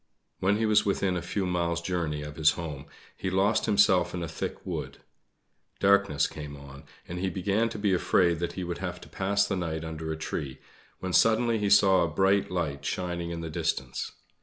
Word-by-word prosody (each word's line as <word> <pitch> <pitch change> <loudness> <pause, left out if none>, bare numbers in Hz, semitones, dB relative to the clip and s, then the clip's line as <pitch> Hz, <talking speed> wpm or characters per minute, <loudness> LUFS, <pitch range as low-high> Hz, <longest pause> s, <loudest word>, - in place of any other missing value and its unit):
When 100 +2 +2
he 110 - +1
was 110 -1 +4
within 100 -2 0
a 90 - -2
few 95 +3 -2
miles 85 -1 0
journey 85 -4 -2
of 75 0 -7
his 80 -1 +5
home, 75 -5 -6 0.3
he - - -3
lost 95 +4 +2
himself 95 -4 +4
in 90 - -3
a - - -3
thick - - -5
wood. - - -4 0.8
Darkness 100 -6 +3
came 75 -1 -7
on, 70 +1 -12 0.2
and 90 +1 -5
he 95 +1 0
began 100 +5 0
to 110 - -6
be 100 -2 +1
afraid 85 -2 +2
that 85 - -2
he 95 - -4
would 85 -1 -4
have 90 -1 -4
to - - -12
pass 100 +1 +1
the 100 - -1
night 80 -3 -3
under 80 0 -5
a 80 - -3
tree, 70 -3 -4 0.4
when 95 -1 -3
suddenly 115 +5 +4
he 105 -1 0
saw 95 -2 +6
a 85 - +2
bright 95 +4 +2
light 75 -6 -2
shining 85 +1 -3
in 85 -1 -4
the 80 - -5
distance. - - -2
90 Hz, 205 wpm, -28 LUFS, 80-100 Hz, 0.8 s, saw